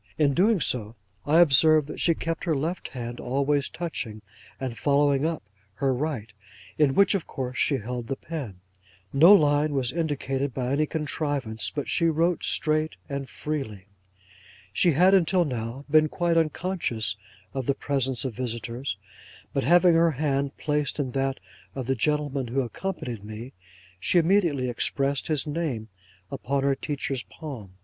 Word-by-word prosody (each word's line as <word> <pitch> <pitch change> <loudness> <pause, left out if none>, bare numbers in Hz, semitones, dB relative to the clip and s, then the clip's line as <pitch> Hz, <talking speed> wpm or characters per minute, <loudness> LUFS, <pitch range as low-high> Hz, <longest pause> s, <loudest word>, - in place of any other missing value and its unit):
In 145 -3 +3
doing 200 +6 +3
so, 115 -6 -1 0.3
I 160 +4 +6
observed 155 0 +5
that 150 - -7
she 165 - +3
kept 165 +1 -3
her 165 -3 +1
left 160 +6 -2
hand 120 -1 -6
always 140 +2 0
touching, 120 -11 -5 0.4
and 130 -3 -4
following 140 +2 +2
up, 165 -7 -3 0.3
her 135 +4 +1
right, 125 -6 -3 0.4
in 145 -3 +3
which, 200 +1 +5
of 195 -5 -2
course, 130 -2 -4
she 140 - +2
held 120 +1 -5
the 135 - -2
pen. 130 - -7 0.5
No 160 +7 +8
line 150 -5 +5
was 130 -3 0
indicated 140 -4 -2
by 125 -1 -1
any 150 +2 +2
contrivance, 145 -7 -2
but 145 - -4
she 170 - +2
wrote 165 +2 +1
straight 155 0 +1
and 140 -1 -4
freely. 135 -11 -4 0.9
She 170 - +3
had, 180 +6 +5
until 185 -1 +4
now, 125 0 -4
been 155 +1 +4
quite 170 +1 0
unconscious 160 - 0 0.4
of 135 -3 -3
the 140 - +2
presence 135 -4 -1
of 130 - -2
visitors; 120 -1 -4 0.6
but, 135 - 0
having 175 +3 +5
her 165 0 +4
hand 140 -1 -1
placed 150 -2 -1
in 135 -4 -2
that 135 +1 -1 0.4
of 130 -2 -4
the 135 - +1
gentleman 145 0 0
who 130 +4 0
accompanied 125 - -5
me, 110 +4 -8 0.5
she 175 - +2
immediately 165 -7 +3
expressed 135 +3 -1
his 150 -4 0
name 145 -8 -3 0.4
upon 140 +1 -1
her 140 0 +3
teacher's 135 -2 -3
palm. 120 - -9
140 Hz, 155 wpm, -26 LUFS, 125-155 Hz, 0.9 s, No